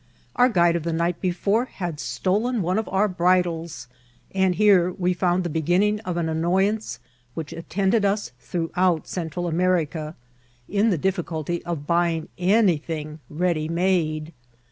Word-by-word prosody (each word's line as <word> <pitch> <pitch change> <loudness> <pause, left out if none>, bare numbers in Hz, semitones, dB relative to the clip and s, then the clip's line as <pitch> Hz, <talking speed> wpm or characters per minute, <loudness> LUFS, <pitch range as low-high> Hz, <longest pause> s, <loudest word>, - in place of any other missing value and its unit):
Our 250 +1 +5
guide 175 -6 +3
of 170 - 0
the 165 +1 -2
night 170 +1 -1
before 200 +6 +1
had 175 -10 -5
stolen 215 +7 0
one 185 +5 +1
of 220 - -4
our 195 +2 +2
bridles; 175 -5 0 0.5
and 190 -2 +2
here 190 -4 +4
we 180 0 0
found 180 0 +1
the - - -2
beginning 180 +7 +1
of 180 -5 -4
an 170 -1 0
annoyance 190 +7 0 0.4
which 160 -2 -5
attended 190 +6 0
us 200 - 0
throughout 170 +5 0
Central 175 0 -4
Am^ 165 - -1 0.3
ica, 155 +1 -7 0.5
in 205 +3 +2
the 185 - +1
difficulty 175 -2 -2
of 165 -4 -4
buying 170 -1 +1
anything 165 -6 +1
ready 160 -1 0
made. 165 -3 0
175 Hz, 145 wpm, -24 LUFS, 165-190 Hz, 0.5 s, Our